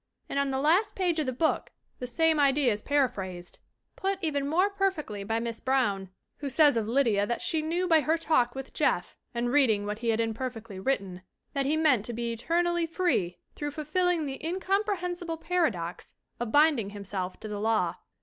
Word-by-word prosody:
And 280 - -1
on 280 0 +1
the 265 - -1
last 365 +9 +3
page 350 -4 +1
of 300 - -1
the - - +1
book 315 +6 0 0.3
the 250 - -4
same 320 +4 +2
idea 275 -2 +4
is 210 0 -2
paraphrased, 190 -11 -1 0.4
put 390 0 -1
even 285 -3 0
more 365 +7 +2
perfectly, 375 - -1
by 225 +3 -1
Miss 230 -1 -4
Brown, 205 -8 +1 0.3
who 285 - -4
says 290 0 +5
of 220 -2 0
Lydia 225 -5 +2
that 235 - -2
she 320 - 0
knew 340 +4 -1
by 325 -2 +6
her 315 +2 +1
talk 260 -7 +2
with 270 0 -7
Jeff - - 0 0.2
and 240 +1 0
reading; 230 -8 +3
what 210 +1 -3
he 235 0 -1
had 225 0 +2
imperfectly 225 -3 -3
written 190 -5 -2 0.3
"that 275 -2 0
he 305 +2 +2
meant 290 -9 +3
to 240 - -4
be 235 0 -2
eternally 340 +7 0
free 325 - 0 0.2
through 295 - -4
fulfilling 315 +3 0
the 270 0 -6
in 345 +4 -2
comprehensible 360 -4 -1
paradox 310 - -2 0.2
of 240 -2 -3
binding 290 -8 +4
himself 195 -2 -5
to 215 - -7
the 210 -1 -4
law." 215 -5 +1
270 Hz, 190 wpm, -28 LUFS, 220-325 Hz, 0.4 s, by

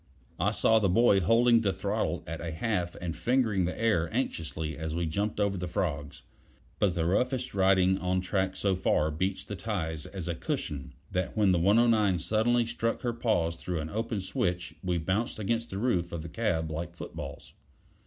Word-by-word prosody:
I - - +3
saw 110 0 +4
the 100 -3 +2
boy 105 +1 +5
holding 115 +5 +4
the 100 -3 +2
throttle - - -2
at 80 -2 -5
a 85 - -3
half 90 0 -1
and 85 -2 -4
fingering 115 -6 +1
the 90 - -4
air 95 -8 +2
anxiously 80 - -2
as 80 0 -4
we 85 0 0
jumped 100 +7 -2
over 100 -1 +1
the 90 0 -3
frogs; 75 -5 -3 0.6
but 95 -4 +2
the 80 -2 0
roughest 125 +8 0
riding 95 -1 +4
on 90 0 0
track 95 +1 -1
so 95 0 +1
far 80 -4 +1
beats 95 +5 -1
the 105 - -6
ties 80 -8 -3
as 95 -3 -6
a 85 - 0
cushion, 70 -5 -4 0.2
that 90 +3 -2
when 105 -3 +4
the 90 - +3
109 105 0 +4
suddenly 110 +8 +2
stuck 115 0 -2
her 120 -1 0
paws 95 -9 0
through 90 0 -3
an 80 +1 -5
open 110 -1 -2
switch 90 -1 -2
we 90 -2 0
bounced 95 +8 -1
against 115 +2 -1
the 95 - -5
roof 95 -7 0
of 85 -2 -4
the 85 - -7
cab 80 -7 -1
like 85 +2 -5
footballs. - - -8
95 Hz, 190 wpm, -29 LUFS, 85-110 Hz, 0.6 s, boy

